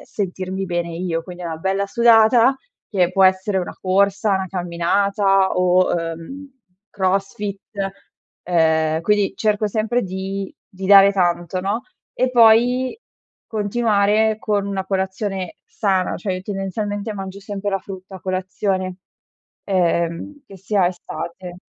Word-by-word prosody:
sentirmi 190 -1 -4
bene 175 -1 -2
io. 165 -1 -3
Quindi, 180 +1 -10
è - - -3
una 160 -1 -4
bella 195 +3 -1
sudata, 235 +3 +5 0.4
che 180 -4 +2
può 195 0 +4
essere 190 +1 +2
una 180 - -5
corsa, 200 +2 +2
'na 190 0 -3
camminata 195 +2 +1
o, 180 0 +3
uhm, 165 - -5 0.4
crossfit. 195 +1 -2 0.9
Uhm, 160 -2 +2
quindi, 205 +1 +2
cerco 215 -1 +1
sempre 225 +4 0
di 190 +1 -5 0.2
di 190 +1 -5
dare 200 0 +8
tanto, 175 -1 0
no, 205 +5 -2 0.3
e 255 - +1
poi, 245 - +4 0.5
continuare 215 0 +1
con 205 -3 0
una 195 -1 -3
colazione 190 -1 -3
sana, 190 -3 0
cioè, 190 +1 -3
io 185 - -5
tendenzialmente 205 +2 -3
mangio 195 0 -6
sempre 200 0 -4
la 195 - 0
frutta 190 0 -10
a - - -13
colazione, 185 0 -2 0.7
ehm, 175 - -1
che 195 - -12
sia 190 0 +1
estate. 175 0 -7
195 Hz, 130 wpm, -20 LUFS, 185-205 Hz, 0.9 s, dare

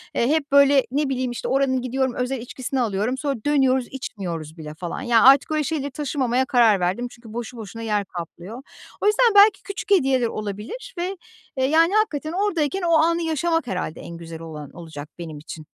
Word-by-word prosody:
Eee, 235 - +2
hep 300 0 0
böyle, 280 -1 +6
ne 285 +1 0
bileyim, 255 -2 -1
işte, 240 - -5
oranın 265 -1 +1
gidiyorum, 260 +1 -1
özel 250 +2 -2
içkisini 255 +2 -3
alıyorum. 220 +3 -1
Sonra 280 0 -1
dönüyoruz 265 -4 +2
içmiyoruz 175 - -6
bile 155 -1 -8
falan. 170 +2 -6
Ya 235 -2 +3
artık 275 +3 +6
öyle 310 -1 +1
şeyleri 285 0 -2
taşımamaya 260 -2 0
karar 235 -6 +4
verdim 185 +8 -1
çünkü 235 -2 -14
boşu 240 +1 -6
boşuna 220 0 -8
yer 210 -3 -1
kaplıyor. 180 +6 -8 0.4
O - - -1
yüzden 435 +1 +4
belki 405 0 +6
küçük 405 +1 -7
hediyeler 265 -10 +3
olabilir 215 - -6
ve, 365 +3 -3 0.5
yani, 330 +5 +4
hakikaten 320 -8 0
oradayken 380 -2 0
o 340 -1 +1
anı 335 +2 +3
yaşamak 325 -1 0
herhâlde 180 -6 -3
en 170 - -8
güzel 165 -1 -9
olan, 155 -3 -8
olacak 160 -3 -9
benim 160 -3 -7
için. 155 +1 -9
255 Hz, 180 wpm, -23 LUFS, 205-300 Hz, 0.5 s, böyle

